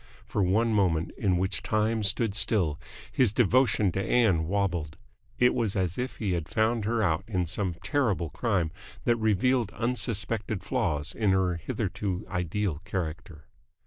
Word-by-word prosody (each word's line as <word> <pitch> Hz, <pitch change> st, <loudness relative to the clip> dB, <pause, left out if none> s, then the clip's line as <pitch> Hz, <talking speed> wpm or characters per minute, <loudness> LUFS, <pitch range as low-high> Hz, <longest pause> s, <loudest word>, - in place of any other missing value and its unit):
For 105 Hz, -, -1 dB
one 110 Hz, +5 st, +2 dB
moment, 85 Hz, -6 st, +1 dB
in 95 Hz, -3 st, +1 dB
which 95 Hz, +2 st, -1 dB
time 110 Hz, +1 st, 0 dB
stood 105 Hz, +1 st, +1 dB
still, 100 Hz, -7 st, +1 dB, 0.3 s
his 125 Hz, -6 st, +3 dB
devotion 115 Hz, -2 st, +3 dB
to 95 Hz, -, -2 dB
Ann 95 Hz, -11 st, +2 dB
wobbled. 90 Hz, -5 st, -1 dB, 0.4 s
It 125 Hz, 0 st, +4 dB
was 115 Hz, -5 st, -1 dB
as 90 Hz, -3 st, 0 dB
if 125 Hz, +1 st, -3 dB
he 105 Hz, -4 st, -2 dB
had 85 Hz, -4 st, -2 dB
found 110 Hz, 0 st, +1 dB
her 115 Hz, 0 st, +1 dB
out 85 Hz, -1 st, +1 dB
in 95 Hz, -5 st, 0 dB
some 90 Hz, +1 st, -2 dB
terrible 95 Hz, -, 0 dB
crime 95 Hz, -9 st, 0 dB, 0.3 s
that 120 Hz, -1 st, +2 dB
revealed 110 Hz, +2 st, +2 dB
unsuspected 110 Hz, -3 st, -1 dB
flaws 75 Hz, +1 st, -1 dB
in 105 Hz, -3 st, 0 dB
her 95 Hz, -2 st, +2 dB
hitherto 90 Hz, +3 st, -3 dB
ideal 90 Hz, -2 st, -2 dB
character. 80 Hz, -3 st, -5 dB
100 Hz, 150 wpm, -28 LUFS, 90-110 Hz, 0.4 s, It